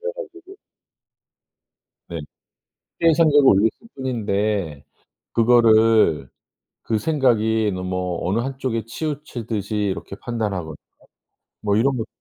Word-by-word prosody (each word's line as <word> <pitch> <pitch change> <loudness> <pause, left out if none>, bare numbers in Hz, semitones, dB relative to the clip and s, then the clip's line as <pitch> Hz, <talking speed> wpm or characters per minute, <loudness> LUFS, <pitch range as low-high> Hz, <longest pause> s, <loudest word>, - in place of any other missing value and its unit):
그래 480 +1 -4
가지고 390 -5 -10 1.5
네. - - -5 0.8
일상적으로 155 -4 +5
올렸을 100 +3 +4 0.3
뿐인데 105 - -2 0.5
그거를 110 - +4 0.5
그 110 - 0
생각이 110 -6 +1
너무 90 -1 -3
어느 95 +5 0
한 130 +2 -4
쪽에 115 -4 -2
치우치듯이 115 - -4
이렇게 100 -1 -2
판단하거나 100 -9 -3 0.9
뭐 100 -1 +1
이런 130 +4 +2
것 115 - -3
110 Hz, 235 characters per minute, -22 LUFS, 100-135 Hz, 1.5 s, 일상적으로